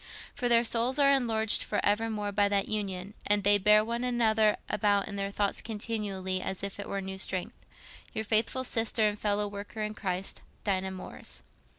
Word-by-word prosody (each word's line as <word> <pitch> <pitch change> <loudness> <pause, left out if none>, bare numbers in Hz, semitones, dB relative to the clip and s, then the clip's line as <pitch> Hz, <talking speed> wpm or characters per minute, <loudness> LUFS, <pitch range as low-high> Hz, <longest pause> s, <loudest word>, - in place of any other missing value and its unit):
For 245 - -1
their 235 0 +5
souls 240 +3 +1
are 280 -1 +5
enlarged 225 -5 +3
for - - -2
evermore 210 0 0
by 200 0 +2
that 200 -1 +1
union, 200 -2 -3
and 205 -1 +3
they 205 +1 +6
bear 210 +2 +5
one 235 +2 -2
another 220 -3 +2
about 205 -1 +1
in 200 - -6
their 200 0 -2
thoughts 200 0 -1
continually 205 -4 -2
as 190 +1 -3
it 200 0 -3
were 200 - -2
a - - -2
new 190 0 -6
strength.—Your 190 +3 -7
faithful 225 +4 +2
Sister 225 -2 +1
and 210 0 -3
fellow 205 0 +1
worker 205 +2 -6
in 215 0 -3
Christ, 190 -2 -3 0.2
"DINAH 190 -1 0
MORRIS." 185 -1 -7
210 Hz, 180 wpm, -29 LUFS, 200-225 Hz, 0.2 s, they